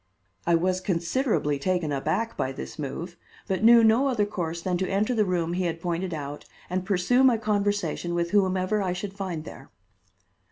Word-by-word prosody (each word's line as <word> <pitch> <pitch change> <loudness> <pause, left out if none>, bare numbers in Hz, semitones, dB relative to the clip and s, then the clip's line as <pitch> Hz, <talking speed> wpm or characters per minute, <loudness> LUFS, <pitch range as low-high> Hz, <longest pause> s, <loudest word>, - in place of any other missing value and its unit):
I 170 - +5
was 185 +2 +1
considerably 170 - 0
taken 175 -1 0
aback 155 +11 -1
by 130 - -2
this 135 - -8
move, 165 +5 -5 0.3
but 190 +2 -1
knew 235 0 +8
no 225 +5 +4
other 235 -6 +1
course 170 -5 -4
than 180 +1 -1
to 190 - -1
enter 210 +5 +1
the 215 -3 +2
room 175 -2 -1
he 180 +1 -1
had 165 -1 -2
pointed 175 +2 -2
out 145 -2 -5 0.3
and 185 0 -1
pursue 200 +7 +2
my 250 -3 +5
conversation 205 -4 -1
with 170 0 -1
whomever 190 0 +2
I 185 -2 -1
should 190 +2 -5
find 185 -6 -4
there. 135 - -11
185 Hz, 185 wpm, -26 LUFS, 170-205 Hz, 0.3 s, knew